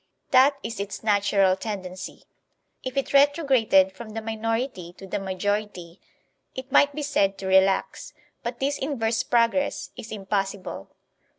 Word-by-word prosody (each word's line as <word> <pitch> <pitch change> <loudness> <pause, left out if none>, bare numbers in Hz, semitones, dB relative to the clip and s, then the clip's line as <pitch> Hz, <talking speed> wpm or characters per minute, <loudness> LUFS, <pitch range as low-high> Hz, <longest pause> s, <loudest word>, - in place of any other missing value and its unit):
That 270 +2 +5
is 225 -2 -5
its 200 +2 -5
natural 200 -2 +3
tendency. 190 -3 -7 0.6
If 255 +1 -5
it 275 - -1
retrograded 275 - +4
from 215 +4 -10
the 225 - -3
minority 225 -4 -3
to 195 - -12
the 190 - -3
majority, 195 -2 -3 0.5
it 260 +1 -7
might 285 +1 +4
be 300 - -3
said 200 -9 +1
to 195 - -7
relax; 190 0 +2 0.3
but 240 0 -5
this 280 +2 -1
inverse 230 -5 -1
progress 235 +4 +1
is 220 - -9
impossible. 195 - -3
215 Hz, 135 wpm, -25 LUFS, 190-255 Hz, 0.6 s, That